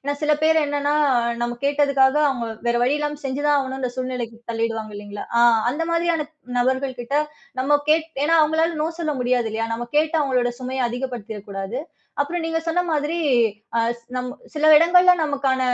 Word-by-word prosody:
ஏனா 285 Hz, +1 st, -1 dB
சில 300 Hz, 0 st, +3 dB
பேர் 320 Hz, 0 st, +4 dB
என்னன்னா, 290 Hz, 0 st, 0 dB, 0.5 s
நம்ம 240 Hz, 0 st, -3 dB
கேட்டதுக்காக 280 Hz, -1 st, +3 dB
அவங்க 245 Hz, -3 st, -3 dB, 0.2 s
வேற 235 Hz, -, +2 dB
வழியில்லாம 295 Hz, +2 st, -1 dB
செஞ்சுதான் 290 Hz, +2 st, 0 dB
ஆகணும்னுன்ற 265 Hz, -1 st, -3 dB
அந்தச் 250 Hz, -1 st, -3 dB
சூழ்நிலைக்குத் 240 Hz, -2 st, -5 dB
தள்ளிடுவாங்க 225 Hz, -1 st, -3 dB
இல்லீங்களா? 205 Hz, 0 st, -7 dB
ஆ -, -, +5 dB, 0.3 s
அந்த 295 Hz, +6 st, -3 dB
மாதிரியான 335 Hz, -2 st, 0 dB, 0.3 s
நபர்கள்கிட்ட 260 Hz, +1 st, -1 dB, 0.4 s
நம்ம 285 Hz, +3 st, +3 dB
கேக் 320 Hz, +1 st, +3 dB, 0.2 s
ஏன்னா 325 Hz, +2 st, +3 dB
அவங்களால 320 Hz, +1 st, +1 dB
நோ 315 Hz, -, 0 dB
சொல்ல 310 Hz, -2 st, -1 dB
முடியாதில்லயா? 235 Hz, -3 st, 0 dB
நம்ம 240 Hz, +1 st, -5 dB
கேட்டு 310 Hz, +2 st, +2 dB
அவங்களோட 250 Hz, -3 st, +1 dB
சுமைய 255 Hz, -1 st, -1 dB
அதிகப்படுத்திற 245 Hz, -4 st, -5 dB
கூடாது. 195 Hz, +5 st, -4 dB, 0.4 s
அப்புறம் 335 Hz, +4 st, -1 dB
நீங்கச் 325 Hz, 0 st, -2 dB
சொன்ன 330 Hz, +2 st, +1 dB
மாதிரி 300 Hz, +2 st, -1 dB, 0.6 s
ஆ -, -, +4 dB, 0.2 s
ஸ் -, -, -27 dB
நம் 250 Hz, 0 st, -2 dB, 0.3 s
சில 305 Hz, 0 st, +1 dB
இடங்கள்ல 360 Hz, +3 st, +6 dB
நமக்கான 275 Hz, -3 st, 0 dB
270 Hz, 160 wpm, -22 LUFS, 245-305 Hz, 0.6 s, இடங்கள்ல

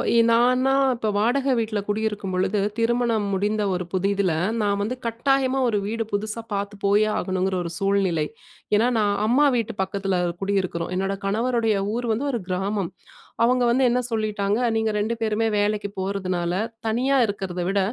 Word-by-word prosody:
எ -, -, +5 dB
நான்னா 250 Hz, +3 st, +3 dB, 0.2 s
இப்போ 220 Hz, -2 st, -2 dB
வாடக 260 Hz, +5 st, +2 dB
வீட்ல 215 Hz, -2 st, -1 dB
குடியிருக்கும்பொழுது, 205 Hz, -2 st, -1 dB, 0.2 s
திருமணம் 230 Hz, -2 st, +1 dB
முடிந்த 210 Hz, +2 st, 0 dB
ஒரு 180 Hz, 0 st, -2 dB
புதிதுல 195 Hz, -1 st, +1 dB, 0.3 s
நான் 200 Hz, -1 st, +1 dB
வந்து 230 Hz, +5 st, -2 dB
கட்டாயமா 265 Hz, +3 st, +1 dB
ஒரு 210 Hz, -3 st, +1 dB
வீடு 225 Hz, +1 st, -2 dB
புதுசா 210 Hz, +2 st, -2 dB
பாத்து 200 Hz, +1 st, -3 dB
போயே 205 Hz, +2 st, +4 dB
ஆகணுங்கிற 185 Hz, 0 st, -1 dB
ஒரு 170 Hz, -, -5 dB
சூழ்நிலை. 195 Hz, -6 st, +1 dB, 0.5 s
ஏனா, 225 Hz, +4 st, +3 dB
நான் 205 Hz, -1 st, +2 dB
அம்மா 275 Hz, +6 st, +4 dB
வீட்டு 225 Hz, -3 st, -2 dB
பக்கத்துல 195 Hz, 0 st, -1 dB, 0.3 s
குடியிருக்கிறோம். 190 Hz, -4 st, -1 dB
என்னோட 195 Hz, +1 st, -1 dB
கணவருடைய 225 Hz, +1 st, +1 dB, 0.2 s
ஊர் 240 Hz, 0 st, -2 dB
வந்து 260 Hz, +7 st, -2 dB
ஒரு 235 Hz, -, -1 dB
கிராமம். 190 Hz, 0 st, -1 dB, 0.5 s
அவங்க 250 Hz, +1 st, +3 dB
வந்து 255 Hz, +3 st, +3 dB
என்ன 245 Hz, +1 st, +2 dB
சொல்லிட்டாங்க, 210 Hz, -2 st, 0 dB, 0.2 s
"நீங்க 220 Hz, 0 st, +1 dB
2 215 Hz, +3 st, 0 dB
பேருமே 220 Hz, 0 st, 0 dB
வேலைக்கு 205 Hz, 0 st, 0 dB
போறதுனால 185 Hz, -3 st, -2 dB, 0.3 s
தனியா 250 Hz, +5 st, +1 dB
இருக்கிறத 190 Hz, -4 st, -4 dB
விட, 195 Hz, +1 st, +1 dB
210 Hz, 150 wpm, -23 LUFS, 195-230 Hz, 0.5 s, எ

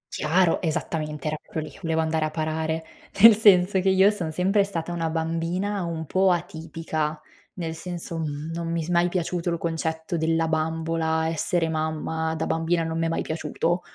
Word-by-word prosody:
Chiaro, 170 Hz, +2 st, +2 dB
esattamente, 155 Hz, -3 st, -3 dB
era 155 Hz, 0 st, -1 dB
proprio 160 Hz, -, -5 dB
lì, -, -, -15 dB
volevo 160 Hz, -2 st, 0 dB
andare 160 Hz, 0 st, 0 dB
a -, -, -1 dB
parare. 160 Hz, +1 st, -2 dB, 0.4 s
Nel 225 Hz, 0 st, +10 dB
senso 195 Hz, -3 st, +5 dB
che 190 Hz, -, +2 dB
io 190 Hz, +2 st, +5 dB
son 175 Hz, -6 st, -3 dB
sempre 190 Hz, +5 st, +2 dB
stata 175 Hz, -4 st, -4 dB
una 165 Hz, -2 st, -1 dB
bambina 165 Hz, +5 st, -1 dB
un 165 Hz, -1 st, -4 dB
po' 190 Hz, +5 st, +2 dB
atipica, 160 Hz, -3 st, -2 dB, 0.4 s
nel 165 Hz, -3 st, -4 dB
senso, 170 Hz, 0 st, -5 dB
mhmm, 150 Hz, 0 st, -4 dB
non 165 Hz, 0 st, -3 dB
mi 165 Hz, -1 st, -1 dB
s 160 Hz, -, -7 dB
mai 175 Hz, 0 st, +3 dB
piaciuto 175 Hz, -1 st, -1 dB
il 170 Hz, -, 0 dB
concetto 160 Hz, 0 st, -3 dB
della 165 Hz, 0 st, +1 dB
bambola, 160 Hz, 0 st, 0 dB
essere 165 Hz, +1 st, +1 dB
mamma, 160 Hz, 0 st, -2 dB
da 160 Hz, -, -2 dB
bambina 165 Hz, +1 st, 0 dB
non 160 Hz, 0 st, -2 dB
mi 165 Hz, -, +1 dB
è -, -, -1 dB
mai 165 Hz, -, -1 dB
piaciuto. 170 Hz, +2 st, -1 dB
165 Hz, 180 wpm, -25 LUFS, 160-175 Hz, 0.4 s, Nel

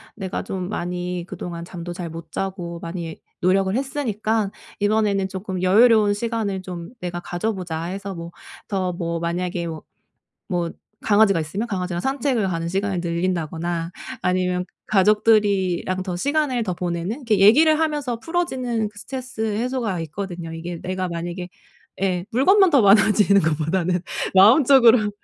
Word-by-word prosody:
"내가 190 Hz, -3 st, -4 dB
좀 185 Hz, -1 st, -4 dB
많이 180 Hz, -2 st, -3 dB
그동안 170 Hz, -1 st, -6 dB
잠도 175 Hz, -1 st, -7 dB
잘 175 Hz, -2 st, -5 dB
못 165 Hz, 0 st, -9 dB
자고 180 Hz, -3 st, -4 dB
많이 170 Hz, -1 st, -5 dB, 0.2 s
노력을 190 Hz, +1 st, +2 dB
했으니까 225 Hz, -6 st, -1 dB, 0.3 s
이번에는 205 Hz, -2 st, +2 dB
쪼끔 190 Hz, -1 st, -5 dB
여유로운 215 Hz, +2 st, +5 dB
시간을 215 Hz, -4 st, -2 dB
좀 175 Hz, +1 st, -7 dB
내가 175 Hz, -1 st, -4 dB
가져 175 Hz, +6 st, -2 dB
보자." 170 Hz, -4 st, -4 dB
해서 195 Hz, +1 st, -5 dB
뭐 170 Hz, 0 st, -7 dB, 0.4 s
더 185 Hz, -3 st, -1 dB
뭐 170 Hz, -1 st, -3 dB
만약에 175 Hz, +1 st, -2 dB
뭐 160 Hz, -2 st, -6 dB, 0.7 s
뭐 175 Hz, -2 st, -1 dB, 0.3 s
강아지가 205 Hz, -4 st, +4 dB
있으면 190 Hz, +9 st, -3 dB
강아지랑 180 Hz, -3 st, -3 dB
산책을 265 Hz, -6 st, 0 dB
가는 165 Hz, -1 st, -2 dB
시간을 195 Hz, 0 st, -1 dB
늘린다거나 170 Hz, -1 st, -2 dB, 0.3 s
아니면 180 Hz, 0 st, 0 dB, 0.2 s
가족들이랑 200 Hz, -3 st, +2 dB
시간을 280 Hz, -, 0 dB
더 185 Hz, -, -2 dB
보내는 175 Hz, +3 st, -2 dB
이렇게 230 Hz, -8 st, 0 dB
얘기를 305 Hz, +11 st, +6 dB
하면서 295 Hz, -7 st, -1 dB
풀어지는 255 Hz, -9 st, -1 dB
그 205 Hz, 0 st, -14 dB
스트레스 255 Hz, 0 st, -8 dB
해소가 220 Hz, -3 st, -1 dB
있거든요. 170 Hz, 0 st, -6 dB
이게 170 Hz, +1 st, -6 dB
내가 185 Hz, 0 st, -2 dB
만약에 175 Hz, +1 st, -5 dB, 0.5 s
예 180 Hz, -2 st, 0 dB
물건만 380 Hz, -, +5 dB
더 280 Hz, -5 st, +5 dB
많아지는 200 Hz, 0 st, +5 dB
것보다는 165 Hz, +3 st, 0 dB, 0.3 s
마음적으로 235 Hz, +1 st, +6 dB
190 Hz, 340 characters per minute, -22 LUFS, 175-220 Hz, 0.7 s, 얘기를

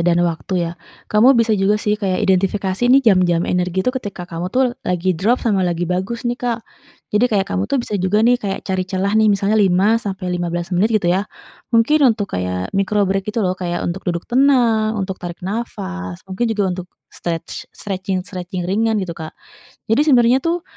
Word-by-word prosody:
dan 170 Hz, 0 st, +2 dB
waktu 175 Hz, +1 st, -1 dB
ya, 165 Hz, -, -4 dB, 0.4 s
kamu 240 Hz, +5 st, +6 dB
bisa 230 Hz, -1 st, +3 dB
juga 205 Hz, 0 st, +2 dB
sih 210 Hz, 0 st, -1 dB
kayak 190 Hz, -3 st, 0 dB
identifikasi 195 Hz, +3 st, +1 dB
nih 270 Hz, +2 st, +5 dB
jam-jam 175 Hz, -2 st, +2 dB
energi 180 Hz, +1 st, -1 dB
itu 255 Hz, -, +1 dB
ketika 205 Hz, -8 st, -5 dB
kamu 175 Hz, 0 st, -5 dB
tuh 250 Hz, +4 st, +1 dB
lagi 180 Hz, +1 st, 0 dB
drop 205 Hz, +9 st, +1 dB
sama 210 Hz, -5 st, +2 dB
lagi 175 Hz, -1 st, 0 dB
bagus 185 Hz, +7 st, -3 dB
nih 240 Hz, +1 st, -2 dB
Kak, 240 Hz, -1 st, -1 dB, 0.5 s
jadi 210 Hz, +3 st, +3 dB
kayak 200 Hz, -4 st, +1 dB
kamu 195 Hz, +3 st, -1 dB
tuh 280 Hz, -, +1 dB
bisa -, -, -5 dB
juga 205 Hz, +4 st, +2 dB
nih 245 Hz, +1 st, +3 dB
kayak 195 Hz, -3 st, -4 dB
cari 190 Hz, -1 st, -1 dB
celah 195 Hz, +1 st, -1 dB
nih 220 Hz, 0 st, +4 dB
misalnya 205 Hz, +1 st, +2 dB
5-15 185 Hz, -3 st, 0 dB
menit 185 Hz, +5 st, +3 dB
gitu 200 Hz, -6 st, +2 dB
ya, 195 Hz, +3 st, -1 dB, 0.4 s
mungkin 250 Hz, +6 st, +3 dB, 0.2 s
untuk 205 Hz, -, -4 dB
kayak 90 Hz, 0 st, -3 dB
micro 200 Hz, +1 st, +1 dB
break 195 Hz, +1 st, -1 dB
gitu 215 Hz, 0 st, -1 dB
loh 180 Hz, -, +1 dB
kayak 175 Hz, -1 st, -2 dB
untuk 175 Hz, +2 st, -3 dB
duduk 170 Hz, -1 st, -2 dB
tenang, 240 Hz, -5 st, +3 dB
untuk 190 Hz, -2 st, -4 dB
tarik 175 Hz, 0 st, -7 dB
nafas, 90 Hz, -, -5 dB
mungkin 190 Hz, +5 st, -2 dB
juga 215 Hz, -2 st, 0 dB, 0.2 s
untuk 180 Hz, -, -11 dB, 0.2 s
stretch 165 Hz, -1 st, -6 dB
stretching-stretching 185 Hz, -1 st, -4 dB
ringan 220 Hz, +3 st, +1 dB
gitu 185 Hz, -4 st, -3 dB
Kak, 160 Hz, -2 st, -7 dB, 0.6 s
jadi 225 Hz, -, +4 dB
sebenarnya 245 Hz, -2 st, +5 dB
tuh 335 Hz, +3 st, -1 dB
195 Hz, 185 wpm, -19 LUFS, 180-225 Hz, 0.6 s, kamu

